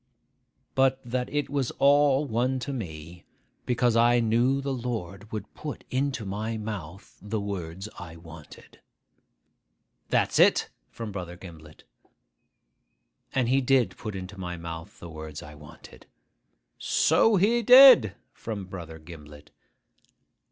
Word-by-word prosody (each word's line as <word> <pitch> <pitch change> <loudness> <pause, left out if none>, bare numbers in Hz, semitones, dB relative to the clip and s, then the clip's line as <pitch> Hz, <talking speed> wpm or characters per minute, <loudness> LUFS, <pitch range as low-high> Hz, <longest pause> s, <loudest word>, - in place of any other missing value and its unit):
but 130 0 +2
that 125 +1 -3
it 145 0 -1
was 140 -3 -1
all 145 0 +4
one 125 +2 0
to 130 +3 -5
me, 85 - -8 0.4
because 120 -1 +1
I 120 +1 +4
knew 120 +4 +2
the 140 0 -3
Lord 110 -5 -5
would 105 -2 -6
put 150 -2 -7
into 130 -3 -1
my 110 +3 -4
mouth 100 -4 -8
the 105 +2 -3
words 95 -2 -5
I 80 -2 -9
wanted.' 80 -2 -14 1.3
('That's - - +1
it!' - - +4 0.2
from 115 -2 -7
Brother 90 -3 -7
Gimblet.) 80 -4 -13 1.5
'And 130 -3 +1
he 135 +3 +2
did 130 -1 +2
put 105 -3 -7
into 95 +1 -8
my 90 -1 -5
mouth 85 +6 -8
the 85 - -9
words 80 -2 -8
I 75 - -11
wanted.' 75 +1 -15 0.7
('So 225 -1 +3
he 220 +6 +3
did!' 245 - +8 0.2
from 105 -4 -6
Brother 85 -4 -9
Gimblet.) 75 -2 -13
105 Hz, 130 wpm, -26 LUFS, 85-130 Hz, 1.5 s, did